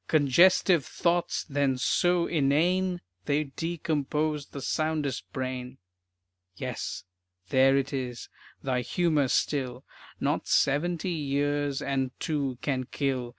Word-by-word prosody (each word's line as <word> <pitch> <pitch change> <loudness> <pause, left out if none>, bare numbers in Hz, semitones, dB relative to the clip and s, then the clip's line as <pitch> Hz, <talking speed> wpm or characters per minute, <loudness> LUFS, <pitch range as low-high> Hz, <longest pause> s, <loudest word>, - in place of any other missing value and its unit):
"Congestive 165 +3 +5
thoughts 175 +4 0
then 140 -3 0
so 175 +6 +2
inane 175 +5 +1 0.2
They'd 145 -1 -1
decompose 155 -2 -1
the 140 - -8
soundest 150 -2 -2
brain." 130 0 -4 0.8
Yes, - - -4 0.5
there 135 +1 +5
it 140 +1 -1
is, 125 -3 -4 0.4
thy 130 -2 0
humor 155 +1 +1
still, 130 -1 -1 0.3
Not - - -1
seventy 170 +6 +1
years 145 -2 -1
and 135 -1 0
two 140 -6 -1
can 130 -3 -1
kill. 130 -2 -2
145 Hz, 110 wpm, -28 LUFS, 135-160 Hz, 0.8 s, Congestive